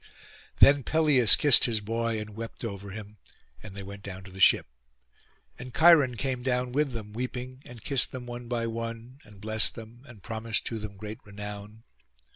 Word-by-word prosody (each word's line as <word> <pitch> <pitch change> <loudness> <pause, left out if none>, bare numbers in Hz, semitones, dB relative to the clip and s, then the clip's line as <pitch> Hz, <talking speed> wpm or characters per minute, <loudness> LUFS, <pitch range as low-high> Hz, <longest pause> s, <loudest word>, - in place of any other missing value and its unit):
Then 140 0 +6
Peleus 145 -5 +4
kissed 145 -5 +5
his 115 -3 +1
boy, 115 +1 -2
and 105 0 -7
wept 115 +2 -7
over 100 -2 -6
him, 105 0 -10 0.4
and 100 +2 -11
they 100 - -7
went 100 +1 -10
down 95 -1 -8
to 95 - -12
the 95 - -11
ship; - - +5 0.9
and 125 0 -9
Cheiron 160 -7 +6
came 130 -1 -2
down 125 -1 -1
with 140 0 0
them, 105 -3 -7
weeping, 125 +2 -6
and 120 -3 -12
kissed 140 -3 +3
them 125 -1 -7
one 120 0 -8
by 120 -1 -2
one, 115 +3 -6
and 105 -2 -17
blest 110 0 +2
them, 115 +1 -12
and 115 -6 -15
promised 115 -1 -3
to 115 - -4
them 105 -2 -8
great 105 +2 -8
renown. 105 +1 -9
115 Hz, 185 wpm, -27 LUFS, 105-125 Hz, 0.9 s, Then